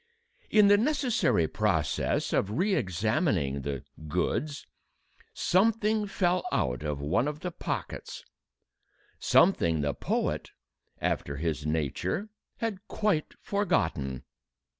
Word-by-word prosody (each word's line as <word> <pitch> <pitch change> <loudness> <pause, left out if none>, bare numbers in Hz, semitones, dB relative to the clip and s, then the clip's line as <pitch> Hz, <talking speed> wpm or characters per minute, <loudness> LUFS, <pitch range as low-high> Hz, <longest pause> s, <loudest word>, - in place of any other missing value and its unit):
In 210 -2 +6
the 205 0 +7
necessary 250 - +2
process - - 0
of 105 +3 0
re 195 +4 +2
examining 95 - 0
the 70 -1 -4 0.2
"goods," 140 - -1 0.7
something 215 +2 +2
fell 180 -2 +1
out 60 -1 0
of 75 -2 -3
one 90 - +1
of 150 +1 -4
the 180 0 -3
pockets, - - -5 0.9
something 80 -2 +4
the 70 -1 0
poet, - - -2 0.5
after 70 0 -1
his 75 -1 -2
nature, 80 - -1 0.3
had 215 -3 -4
quite 205 -8 0
forgotten. 80 - 0
115 Hz, 105 wpm, -29 LUFS, -, 0.9 s, the